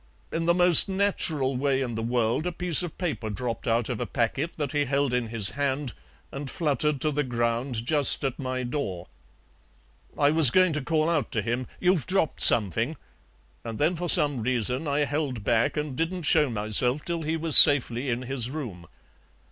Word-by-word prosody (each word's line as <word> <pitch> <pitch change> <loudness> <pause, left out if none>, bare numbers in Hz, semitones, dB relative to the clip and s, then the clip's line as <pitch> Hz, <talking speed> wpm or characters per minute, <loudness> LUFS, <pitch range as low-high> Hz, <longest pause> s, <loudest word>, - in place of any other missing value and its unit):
In 165 0 -4
the 170 - +2
most 180 +1 +5
natural 170 -9 -1
way 135 +1 -1
in 125 -3 -4
the 110 - -5
world 120 +6 -2
a - - -3
piece 175 -1 -1
of 175 -3 -8
paper 150 -11 -5
dropped 115 +4 -6
out 115 0 -1
of 120 -4 -5
a - - -4
packet 135 +8 -3
that 145 -3 -4
he 145 -1 -1
held 140 -1 -2
in 125 -2 -2
his 110 -3 -1
hand 140 -2 -4 0.4
and 140 0 -8
fluttered 150 -2 -1
to 155 - -1
the 150 0 -2
ground 120 -1 -3
just 145 +1 +2
at 135 -3 -4
my 130 -1 -5
door. 100 - -5 1.1
I 145 0 +2
was 155 -4 +5
going 185 +4 +2
to 150 - -2
call 155 +2 -1
out 160 -8 -2
to 110 - -2
him 120 +3 -4
'You've 180 -5 0
dropped 185 -5 -2
something,' 115 - +2 0.7
and 115 -2 -7
then 160 +5 -1
for 175 +1 -5
some 145 -6 +6
reason 125 +4 -2
I 145 +1 -1
held 140 -6 -5
back 115 +6 -1
and 150 -3 -5
didn't 170 +4 -4
show 150 -1 +1
myself 115 +5 0
till 170 -1 -4
he 160 +1 -3
was 160 -2 +6
safely 135 -3 +8
in 120 +1 -3
his 125 -2 -1
room. 115 - -8
140 Hz, 190 wpm, -24 LUFS, 120-155 Hz, 1.1 s, safely